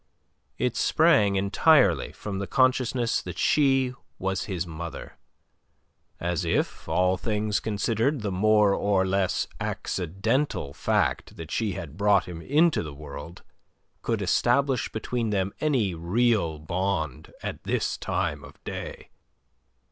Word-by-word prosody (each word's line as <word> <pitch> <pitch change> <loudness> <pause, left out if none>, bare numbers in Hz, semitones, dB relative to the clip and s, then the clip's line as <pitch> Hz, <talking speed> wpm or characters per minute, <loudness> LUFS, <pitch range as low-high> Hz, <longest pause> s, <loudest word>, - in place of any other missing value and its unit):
It - - 0
sprang 100 -2 +4
entirely 100 +11 +3
from 100 -2 -5
the 100 - -3
consciousness 130 -2 +2
that 90 -1 -7
she 135 -2 +3 0.2
was 95 0 -2
his 90 -4 -3
mother; 85 -1 -7 1.0
as 85 +1 -1
if, 85 - -1
all 90 +1 +2
things 105 0 -1
considered, 115 +6 0
the 105 -1 -2
more 105 +1 +4
or 100 -2 +2
less 95 -1 0
accidental 95 - -1
fact 105 - 0
that 80 -2 -8
she 110 -4 0
had 80 -2 -7
brought 100 0 +3
him 85 -2 -8
into 155 - +3
the 75 -3 -7
world 75 +3 -9 0.6
could 115 -3 -1
establish 125 +7 +2
between 115 +1 -2
them 100 -1 0
any 125 -11 +1
real 90 0 +1
bond 80 -2 -2
at - - -5
this - - -1
time - - -2
of - - -13
day! - - -7
100 Hz, 125 wpm, -26 LUFS, 90-115 Hz, 1.0 s, sprang